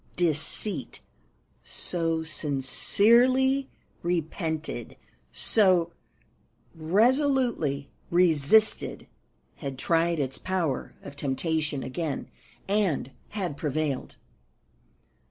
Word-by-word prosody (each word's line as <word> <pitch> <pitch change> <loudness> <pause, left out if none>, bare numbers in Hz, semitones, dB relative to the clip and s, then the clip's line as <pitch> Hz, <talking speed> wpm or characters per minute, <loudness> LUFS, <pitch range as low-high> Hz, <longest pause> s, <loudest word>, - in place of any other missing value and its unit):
Deceit, 165 +1 -1 0.6
so 165 -2 -1
sincerely 235 - +2 0.3
repented, 160 -2 -3 0.4
so 185 -6 +4 0.8
resolutely 210 - +1 0.2
resisted, 175 +4 +3 0.5
had 135 -3 -6
tried 165 +3 +1
its 135 -2 -1
power 175 -8 -2
of 140 - -9
temptation 145 +1 -1
again, 145 +2 -4 0.4
and 195 -10 0 0.2
had 185 -8 -3
prevailed. 145 -2 -3
165 Hz, 65 wpm, -27 LUFS, 145-200 Hz, 0.8 s, so